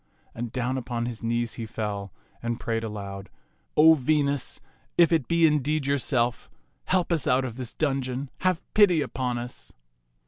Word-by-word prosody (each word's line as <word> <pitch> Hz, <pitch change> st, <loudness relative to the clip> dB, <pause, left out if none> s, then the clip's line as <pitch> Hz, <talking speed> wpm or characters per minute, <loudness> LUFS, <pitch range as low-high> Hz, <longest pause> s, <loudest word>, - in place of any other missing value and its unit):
And 120 Hz, 0 st, -5 dB
down 130 Hz, +1 st, -1 dB
upon 120 Hz, -2 st, -3 dB
his 120 Hz, -2 st, -5 dB
knees 115 Hz, 0 st, -1 dB
he 115 Hz, -2 st, -6 dB
fell, 100 Hz, -3 st, -4 dB, 0.3 s
and 120 Hz, 0 st, -2 dB
prayed 115 Hz, -1 st, -2 dB
aloud, 100 Hz, -2 st, -6 dB, 0.2 s
" -, -, -43 dB
O 160 Hz, +1 st, +9 dB
Venus, 145 Hz, -1 st, 0 dB, 0.4 s
if 170 Hz, 0 st, +6 dB
it 155 Hz, -7 st, +2 dB
be 170 Hz, -1 st, +4 dB
indeed 150 Hz, -1 st, +2 dB
yourself, 130 Hz, -3 st, 0 dB, 0.4 s
help 185 Hz, -2 st, +1 dB
us 165 Hz, -5 st, +1 dB
out 130 Hz, +1 st, +3 dB
of 120 Hz, -3 st, -5 dB
this 125 Hz, -2 st, -6 dB
dungeon. 135 Hz, -2 st, -1 dB
Have 185 Hz, -2 st, +1 dB
pity 180 Hz, -7 st, +5 dB
upon 125 Hz, -3 st, -2 dB
us 120 Hz, +1 st, -7 dB
130 Hz, 165 wpm, -26 LUFS, 115-150 Hz, 0.4 s, O